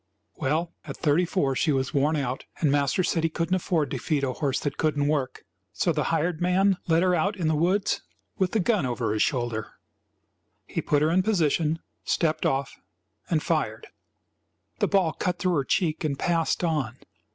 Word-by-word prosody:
Well, 160 +5 -1
at - - -7
thirty 160 +3 +2
four 140 -7 0
she 155 - +2
was 135 +1 -1
worn 145 +2 +2
out, 135 -3 -2
and 150 -4 +2
master 140 +5 +2
said 165 -1 0
he 165 - +2
couldn't 165 +2 -2
afford 170 -5 0
to 130 - -2
feed 145 +3 -1
a 130 -2 0
horse 140 -2 -1
that 145 -2 -3
couldn't 145 -2 +1
work, 145 -4 -1 0.3
so 175 - +1
the 150 -1 0
hired 165 +1 0
man 185 +2 +3
led 165 +1 +3
her 185 -1 +3
out 195 +5 +1
in 170 -4 -1
the 160 - +2
woods 180 +6 +1 0.4
with 185 -1 +1
the 220 - +2
gun 210 -1 +2
over 120 -4 -1
his 110 - 0
shoulder. 120 -4 -1 0.9
He - - -3
put 145 0 +2
her 155 - +3
in 185 +2 +4
position, 165 -5 +1 0.2
stepped 160 -2 +1
off 135 -1 -2 0.5
and - - +1
fired. - - -1 0.9
The - - +2
ball 185 -5 +2
cut 180 -1 -2
through 180 0 0
her 145 -4 +1
cheek 160 +3 0
and 145 -3 -1
passed 165 +1 0
on. 145 -8 -1
155 Hz, 190 wpm, -26 LUFS, 140-175 Hz, 0.9 s, in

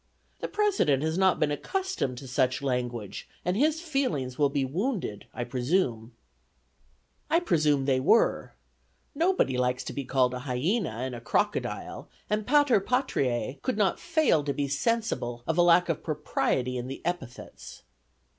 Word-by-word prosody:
The - - -3
President 390 - +1
has 160 0 0
not 190 0 +3
been 150 -1 +2
accustomed 375 - -2
to 135 +1 -8
such 130 +2 0
language, 120 -6 -3 0.2
and 180 +1 +1
his 305 +7 +2
feelings 255 - -1
will 145 0 +2
be 140 -1 0
wounded, 175 - -3
I 120 - -4
presume." 120 -2 -1 1.2
I 330 - +4
presume 150 - +2
they 135 -2 +2
were. 180 - +2 0.6
Nobody 320 - +1
likes 125 0 0
to - - -6
be 140 - -3
called 130 -1 +1
a 125 - -4
hyena 145 - -1
and 125 +4 -4
a 120 - -7
crocodile, - - -2 0.2
and 210 0 0
Pater 290 -4 +5
Patriae 135 - -1
could 255 - -2
not 205 -3 +2
fail 315 - +2
to 140 -1 -2
be 145 -1 -1
sensible 140 - -1
of 160 - 0
a 175 - +4
lack 175 +1 +5
of 165 -3 -1
propriety 135 -4 -1
in 125 0 -4
the 135 - -8
epithets. 175 -9 -6
145 Hz, 155 wpm, -28 LUFS, -, 1.2 s, Pater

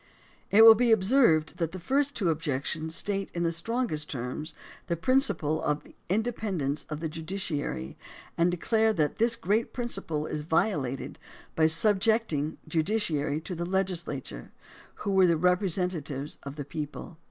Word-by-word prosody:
It 220 +2 +7
will 225 - +12
be 235 +1 +2
observed 190 - +4
that 165 -1 -2
the 185 - -5
first 280 +9 +1
two 185 -7 +1
objections 155 +1 -2
state 195 -1 -1
in 170 - -1
the 165 - +1
strongest 170 -3 -2
terms 130 +5 -5 0.3
the 170 - 0
principle 170 - +1
of 150 0 -1
the - - -17 0.2
independence 195 - -1
of 155 0 -5
the 165 - -1
judiciary, 160 - -4 0.4
and 170 +1 +3
declare 220 +5 +1
that 155 -2 -1
this 230 +1 +3
great 215 +2 0
principle 165 - -2
is 150 - -4
violated 150 - -1 0.4
by 160 -1 +4
subjecting 195 -3 +2
the - - -17
judiciary 160 -4 0
to 180 - -6
the 170 0 -3
legisla 180 -6 -1
ture, - - -9 0.5
who 200 - 0
were 190 -1 +5
the 170 -1 +3
representatives 180 -5 -1
of 140 0 -8
the 145 -2 -6
people. 150 +3 -7
170 Hz, 155 wpm, -28 LUFS, 155-210 Hz, 0.5 s, will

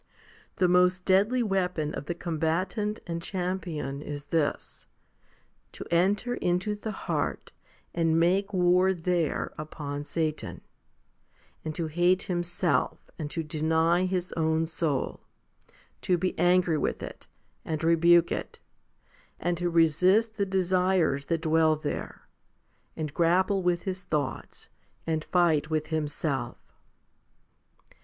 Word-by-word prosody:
1 - - -42 0.5
The 180 - +3
most 180 +1 +3
deadly 205 +6 +3
weapon 180 -7 -1
of 145 - -6
the 175 - -2
combatant 180 +6 -1
and 170 -1 -4
champion 175 -7 -3
is 145 -1 -6
this, 150 0 -2 0.9
to - - -8
enter 195 +8 +2
into 180 -1 0
the 210 +1 -6
heart - - -3 0.4
and 165 -1 +2
make 190 +4 +2
war 180 0 +3
there 170 -2 -1
upon 145 -2 -5
Satan, 155 +1 -3 1.0
and 155 -1 -4
to 170 - -2
hate 175 +4 +2
himself 175 0 -1
and 150 -2 -3
to 165 +2 -3
deny 160 +3 +1
his 180 -1 -2
own 160 0 +1
soul, 160 -4 -2 0.8
to 180 - +2
be 185 +2 -1
angry 175 -3 +3
with - - -2
it - - -9 0.4
and 155 -1 -3
rebuke 170 +1 +5
it, - - -4 0.8
and 175 +1 0
to 175 0 0
resist 180 +7 +3
the 200 -2 -1
desires 185 -6 +1
that 165 0 -1
dwell 160 -1 +3
there, 150 -1 -5 0.7
and 155 -3 -4
grapple 185 +4 +2
with 175 -1 0
his 190 -2 -4
thoughts, 150 -5 -4 0.4
and 160 -1 -1
fight 160 -4 +2
with 155 -1 -1
himself. 145 -4 -2
170 Hz, 125 wpm, -28 LUFS, 155-185 Hz, 1.0 s, rebuke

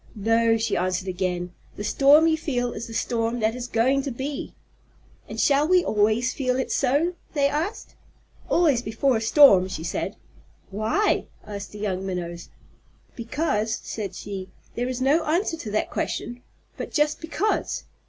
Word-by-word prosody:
"No," 225 +2 +2
she 225 - -1
answered 185 +1 -1
again. 180 -1 -2 0.2
"The 205 - -6
storm 280 +8 +5
you 325 -1 +4
feel 245 -6 -2
is 220 - -6
the 225 - -9
storm 230 +1 -1
that 220 +1 +2
is 250 0 -5
going 250 +4 +2
to 275 - -4
be." 270 +3 -5 0.7
"And - - -6
shall 285 +1 +3
we 365 0 +4
always 220 +4 +2
feel 255 -2 0
it 260 - -2
so?" 310 +7 +1 0.2
they 280 -1 +3
asked. 315 +9 -3 0.6
"Always 300 -8 +3
before 240 +3 +1
a - - -3
storm," 225 -6 +6
she 175 -4 -5
said. 170 - -3 0.6
"Why?" 220 - +1 0.2
asked 200 -1 -7
the 210 - -10
young 195 -3 -2
Minnows. 175 -2 -5 0.7
"Because," 230 -3 -1
said 200 -4 -5
she. 190 -1 -6 0.2
"There 245 +1 -2
is 255 0 -4
no 290 +5 +3
answer 335 +3 +1
to 230 - -6
that 215 +1 -1
question, 240 +1 -3 0.4
but - - -5
just 300 0 +1
'because.' 340 +6 -1
235 Hz, 165 wpm, -24 LUFS, 210-285 Hz, 0.7 s, storm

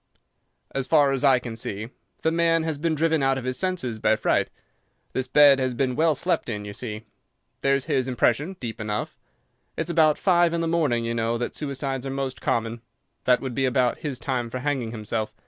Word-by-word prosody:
"As 135 -1 -2
far 145 -3 +4
as 135 0 -1
I 135 -2 +6
can 120 -2 -6
see, 110 0 -4 0.3
the 160 - +2
man 165 0 +2
has 160 -3 -2
been 165 0 0
driven 160 0 +1
out 135 0 +2
of 130 - -5
his 130 0 -2
senses 170 -12 -2
by - - +3
fright. - - +1 0.6
The 130 0 -2
bed 145 -2 +7
has 130 -1 -1
been 125 0 0
well 160 +1 +3
slept - - 0
in, 105 -2 -4
you 105 - -7
see. 110 0 -6 0.6
There's 135 -1 +2
his 130 -1 0
impression 130 +7 +1
deep 115 -2 -5
enough. 105 -1 -3 0.6
It's 165 +1 -2
about 155 -3 +4
five 175 -3 +3
in 165 - -1
the 165 - 0
morning, 150 -9 +1
you 115 - -1
know, 115 0 0
that 120 - -3
suicides 135 -2 -3
are - - -3
most 135 -1 -4
common. 115 0 -1 0.4
That 125 -1 +4
would 130 -2 -4
be 135 +3 0
about 125 -1 +1
his 140 -4 -3
time 120 -1 -2
for 130 - -4
hanging 130 -3 -1
himself. 110 -1 -3
130 Hz, 205 wpm, -25 LUFS, 120-150 Hz, 0.6 s, bed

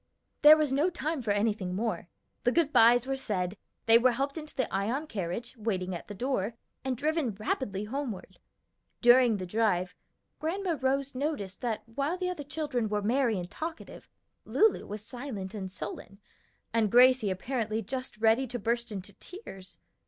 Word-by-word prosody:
There 300 +1 +10
was 305 -3 +1
no 295 +6 +3
time 315 -3 -3
for 225 - -4
anything 205 -3 0
more; 215 -3 -2 0.3
the 245 - +3
good 315 0 +2
bys 235 +2 +6
were 270 0 -1
said, 200 -8 -2 0.3
they 230 0 +7
were 250 +1 +4
helped 275 +3 -2
into 310 -2 -8
the 260 - 0
Ion 225 +10 0
carriage, 220 - -4
waiting 190 -5 -2
at 170 - -6
the 205 - -7
door, 235 -2 -1 0.3
and 260 -2 -1
driven 300 -5 0
rapidly 205 -1 -2
homeward. 235 -2 -5 0.6
During 240 -2 +6
the 185 - -4
drive 185 -2 +1 0.5
Grandma 345 +2 -1
Rose 275 +1 0
noticed 255 -9 -3
that 230 -3 -2
while 280 +9 -2
the 365 0 -1
other 345 -5 -5
children 285 -6 -2
were 210 0 -1
merry 235 0 +2
and 175 -1 -4
talkative, 325 +1 -7 0.3
Lulu 440 -1 +2
was 210 +1 -6
silent 240 -7 -6
and 195 -3 -5
sullen, 200 0 -7 0.6
and 225 -2 +3
Gracie 250 -3 +6
apparently 220 +2 -2
just 255 +2 -5
ready 225 +4 +3
to 245 +1 -4
burst 235 +1 -1
into 195 -1 -6
tears. 195 - -11
235 Hz, 165 wpm, -29 LUFS, 205-275 Hz, 0.6 s, There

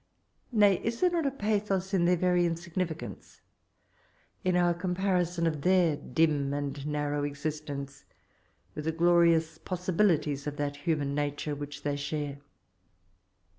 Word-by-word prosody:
Kay, 205 -5 +4
is 230 +1 -2
there 360 -1 +3
not 335 -4 +1
a - - +3
pathos 205 -6 -1
in 175 -3 +3
their 180 +1 +4
veiy 180 0 +3
insignificance, 170 0 -4 0.5
— - - -37
in 185 -2 +2
our 175 -1 +3
comparison 180 -1 0
of 155 -3 -1
their 180 -2 +3
dim 145 0 +1
and 145 0 -4
narrow 145 -1 -1
existence 145 -1 -5 0.7
with 150 - -6
the 160 - +1
glorious 165 -1 +3
possibilities 170 -6 0
of 145 0 -4
that 145 0 -2
human 145 -2 -1
nature 145 +1 -2
which 145 0 -7
they 145 -1 0
share 145 0 -3
165 Hz, 135 wpm, -29 LUFS, 145-180 Hz, 0.7 s, Kay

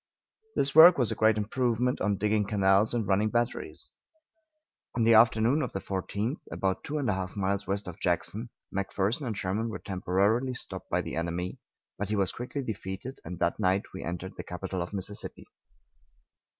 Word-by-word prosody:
This 135 - +2
work 165 +3 +10
was 125 -5 +2
a - - -1
great 110 0 +4
improvement 120 +3 0
on 105 -2 +1
digging 105 0 +1
canals 100 +1 +3
and 120 -3 0
running 100 +3 +2
batteries. 120 +1 -1 1.0
On 120 - +2
the 115 +1 +6
afternoon 115 +5 +5
of - - -3
the 95 - -2
14th, 100 - -2
about 95 -1 -1
two 150 - -3
and 140 -4 -1
a 105 - +2
half 95 -1 -4
miles 100 0 -1
west 100 0 -2
of 90 - -7
Jackson, 100 +6 -1 0.3
McPherson 100 +6 -1
and 110 -3 -3
Sherman 105 +5 -1
were 110 - -4
temporarily 100 +7 0
stopped - - -6
by - - +1
the - - -5
enemy, 85 +2 -3 0.4
but 105 0 -2
he 105 - +1
was 95 -2 +1
quickly 125 +3 -5
defeated, 105 +2 -5
and 90 +2 -6
that 85 0 0
night 95 +2 +1
we 95 - -6
entered 90 +2 -5
the - - -5
capital 90 +1 -4
of 85 - -4
Mississippi. 100 0 -5
105 Hz, 180 wpm, -29 LUFS, 95-115 Hz, 1.0 s, work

